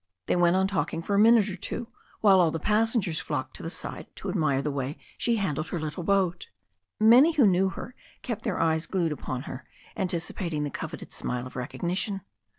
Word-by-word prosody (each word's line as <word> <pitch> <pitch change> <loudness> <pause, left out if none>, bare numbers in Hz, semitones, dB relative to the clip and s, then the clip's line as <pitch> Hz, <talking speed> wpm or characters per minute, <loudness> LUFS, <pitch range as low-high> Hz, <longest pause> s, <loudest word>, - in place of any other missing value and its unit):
They - - +1
went 175 0 +4
on 190 0 +3
talking 190 -4 -1
for 200 - -2
a 200 - +4
minute 225 -1 +6
or 190 - -4
two, 230 +5 -4 0.3
while 195 -3 +6
all 170 - +4
the 165 - -3
passengers 210 -4 +1
flocked - - -4
to - - -10
the - - -4
side - - -6
to - - -6
admire 155 -8 +1
the 150 - -1
way 140 +1 -3 0.2
she 235 - +1
handled 160 -7 -1
her 175 - -3
little 155 +2 -4
boat. 185 -2 +1 0.5
Many 245 +9 +7
who 290 -6 +5
knew 190 0 +4
her 230 +5 -8 0.3
kept 230 -3 -3
their 215 -6 -1
eyes 160 0 +1
glued 175 -4 0
upon 130 -3 -4
her, 130 - -7 0.3
anticipating 170 -3 -2
the 145 - -3
coveted - - -7
smile 125 0 -3
of 130 - -10
recognition. 175 - -2
180 Hz, 200 wpm, -27 LUFS, 155-205 Hz, 0.5 s, Many